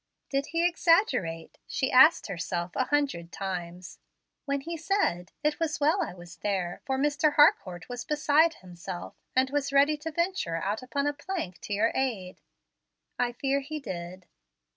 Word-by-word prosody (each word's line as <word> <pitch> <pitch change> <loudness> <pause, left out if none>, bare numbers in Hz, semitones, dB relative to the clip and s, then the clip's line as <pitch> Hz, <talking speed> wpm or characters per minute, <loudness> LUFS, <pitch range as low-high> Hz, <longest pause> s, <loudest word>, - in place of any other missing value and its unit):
"Did 275 +1 0
he 335 +3 +2
exaggerate," 330 - +1
she 265 - -1
asked 305 +6 +7
herself 175 -2 -3
a 260 - +1
hundred 275 -14 -1
times, 180 -2 -6 0.5
"when 280 -1 -1
he 335 +4 -5
said, 325 - 0
'It 300 +1 +1
was 320 -2 -1
well 310 +6 +3
I - - -2
was 175 -2 -12
there; 185 -2 -2
for 265 -1 0
Mr. 295 +2 +2
Harcourt 185 - +4
was 245 -1 -5
beside 305 +2 +3
himself, 175 0 -8 0.2
and 260 +1 +3
was 290 -1 -1
ready 285 +2 +4
to 305 +2 -5
venture 340 - -1
out 200 +6 -2
upon 280 +3 -2
a 290 - +1
plank 290 - -5
to 205 - -5
your 220 +3 +2
aid'? 220 -9 -2 0.8
I 245 -1 +1
fear 275 +3 0
he 305 +3 -6
did." 180 -6 -7
265 Hz, 165 wpm, -28 LUFS, 185-300 Hz, 0.8 s, asked